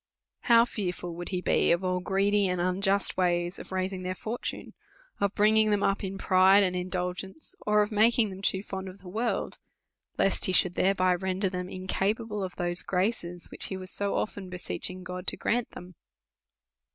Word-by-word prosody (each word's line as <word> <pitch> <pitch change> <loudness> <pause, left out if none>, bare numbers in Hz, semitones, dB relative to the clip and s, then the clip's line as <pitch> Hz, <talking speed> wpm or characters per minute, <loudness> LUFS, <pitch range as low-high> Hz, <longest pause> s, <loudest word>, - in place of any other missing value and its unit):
How 235 -1 +5
fearful 180 -6 -4
would 175 +1 -6
he 180 -2 -2
be - - +2
of 170 +2 +2
all 185 0 0
greedy 195 +2 +2
and 180 -1 -1
unjust 195 +3 +2
ways 175 0 +1
of - - -10
raising 185 0 -2
their 185 0 -3
fortune, 225 +5 -5 0.5
of 200 0 0
bringing 215 +1 +4
them 205 -1 +2
up 195 +1 +1
in 195 0 -4
pride 190 +1 +5
and 180 -1 0
indulgence, 180 - -4
or 210 0 +5
of 210 - -5
making 220 0 +3
them 190 0 -9
too 195 -1 0
fond 190 -2 -5
of 185 - -11
the 190 - -15
world, 225 +6 -2 0.6
lest 195 - +2
he 185 - +1
should 180 -1 +3
thereby 185 -1 +2
render 190 +2 -1
them 180 -1 -4
incapa 195 +4 -2
ble 210 -2 -4
of 185 -1 -5
those 175 0 -1
graces, 180 -2 -2
which - - -3
he 190 - -4
was 185 -1 -8
so 200 0 -2
often 200 -3 -3
beseechinj^ 185 0 -4
God 180 0 -7
to - - -1
grant 240 0 0
them. 180 +1 -10
190 Hz, 190 wpm, -28 LUFS, 180-205 Hz, 0.6 s, How